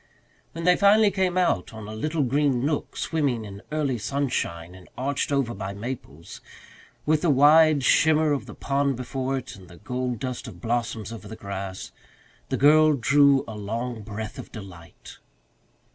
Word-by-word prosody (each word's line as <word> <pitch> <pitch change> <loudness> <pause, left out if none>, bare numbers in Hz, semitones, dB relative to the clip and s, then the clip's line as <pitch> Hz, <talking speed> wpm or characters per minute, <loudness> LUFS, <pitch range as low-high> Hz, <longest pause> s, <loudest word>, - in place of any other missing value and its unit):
When 165 - -6
they 180 +1 +5
finally 205 +2 +5
came 185 -2 0
out 115 - 0
on 110 -1 -8
a 110 - -7
little 155 +7 -1
green 135 -1 +1
nook 150 -1 -2
swimming 140 -9 -1
in 100 -1 -9
early 145 -6 -1
sunshine 105 -9 -2
and 95 -1 -15
arched 140 +2 -1
over 135 -4 0
by 100 -1 -6
maples, 105 - -8 0.6
with 155 0 +2
the 175 - +2
wide 150 +1 +5
shimmer 155 +3 +4
of 140 - -2
the - - -9
pond 140 0 0
before 130 +2 -3
it 130 -1 -7
and 95 -2 -14
the 85 0 -14
gold 125 +3 -3
dust 125 +2 -5
of - - -10
blossoms 115 -2 -2
over 110 - -9
the 110 - -8
grass, 100 -3 -6 0.6
the - - -1
girl 155 +2 +6
drew 140 +1 +4
a 110 - -7
long 115 +3 -4
breath 110 +1 -7
of - - -9
delight. 90 -6 -12
130 Hz, 170 wpm, -25 LUFS, 110-145 Hz, 0.6 s, girl